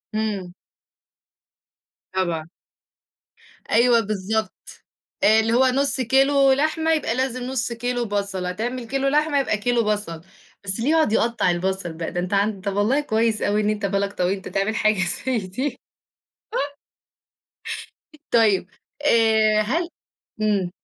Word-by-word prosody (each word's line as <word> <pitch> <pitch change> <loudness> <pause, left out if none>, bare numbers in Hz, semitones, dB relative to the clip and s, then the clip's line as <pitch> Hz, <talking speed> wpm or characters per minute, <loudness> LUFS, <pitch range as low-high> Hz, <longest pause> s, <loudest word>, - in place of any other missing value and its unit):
إمم. 200 -5 -2 1.6
طبعًا. 170 -4 -2 1.2
أيوه 235 +1 +5
بالضبط. 215 +1 -4 0.4
آآ 220 +1 +6
اللي 225 +1 +1
هو 260 +2 +4
نُص 270 +1 +1
كيلو 270 +2 +4
لحمة 315 +3 +1
يبقى 270 -7 0
لازم 255 -1 -1
نُص 245 -2 -2
كيلو 245 +1 -2
بَصَل، 200 -3 -2
هتعمل 230 +6 -3
كيلو 275 +2 -1
لحمة 295 0 +2
يبقى 235 -6 0
كيلو 235 +2 +1
بَصَل. 205 -6 -2 0.4
بس 195 +2 -1
اللي 255 +6 0
يقعُد 315 -8 +3
يقطّع 235 -6 +2
البَصَل 180 -1 -2
بقى، 165 0 -5
ده 175 - -3
أنت 180 +2 -3
عن 200 0 +1
طَب 200 0 -3
والله 225 +8 +2
كويس 225 -4 0
أوي 210 +1 +1
إن 210 - +1
أنت 210 -1 -1
بالك 200 0 -1
طويل، 180 +2 0
أنت 190 - -9
تعمل 200 +3 -1
حاجة 215 -2 +2 0.3
زي 255 -3 +2
دي. 205 +10 -4 2.5
طيب، 210 -5 +3 0.3
آآ 220 -5 +4
هل 330 +11 -1 0.5
إمم. 200 -4 +1
220 Hz, 135 wpm, -23 LUFS, 195-255 Hz, 2.5 s, آآ